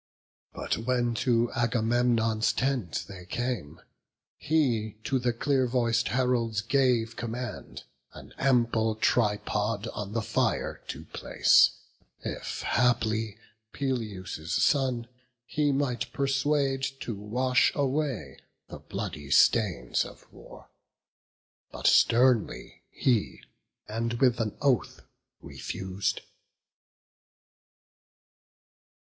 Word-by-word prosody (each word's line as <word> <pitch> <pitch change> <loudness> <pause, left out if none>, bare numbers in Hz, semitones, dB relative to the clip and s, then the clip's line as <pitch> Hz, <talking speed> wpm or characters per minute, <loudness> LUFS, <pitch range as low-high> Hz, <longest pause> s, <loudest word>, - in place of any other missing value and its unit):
But - - -2
when 120 0 0
to 120 -2 +2
Agamemnon's 115 -2 +1
tent 130 -9 -1
they 95 -2 -10
came, 120 - -3 0.6
He 120 -9 0
to 135 -2 0
the 125 0 +1
clear 130 +2 +1
voic'd 120 -1 +1
heralds 120 -4 0
gave 120 -2 +1
command 120 +2 -6 0.3
An - - -13
ample 115 -4 +2
tripod 105 -1 0
on 105 -2 -6
the 115 -1 -1
fire - - -1
to - - -7
place; - - +3 0.4
If - - -5
haply 110 -3 +1 0.4
Peleus' 105 - -4
son 130 -3 +1 0.4
he 145 +3 0
might 130 -3 -1
persuade 135 0 +1 0.2
To 120 - -3
wash 120 +5 +1
away 135 - -2 0.3
the - - -8
bloody 75 -2 -6
stains 85 - +3
of - - -12
war: - - -14 1.0
But - - -8
sternly 120 -2 +3
he, 120 -5 0 0.4
and 115 +2 -2
with 120 -1 +2
an 110 -2 -3
oath 135 -4 +1 0.4
refus'd. 95 +1 -3
120 Hz, 95 wpm, -28 LUFS, 110-130 Hz, 1.0 s, place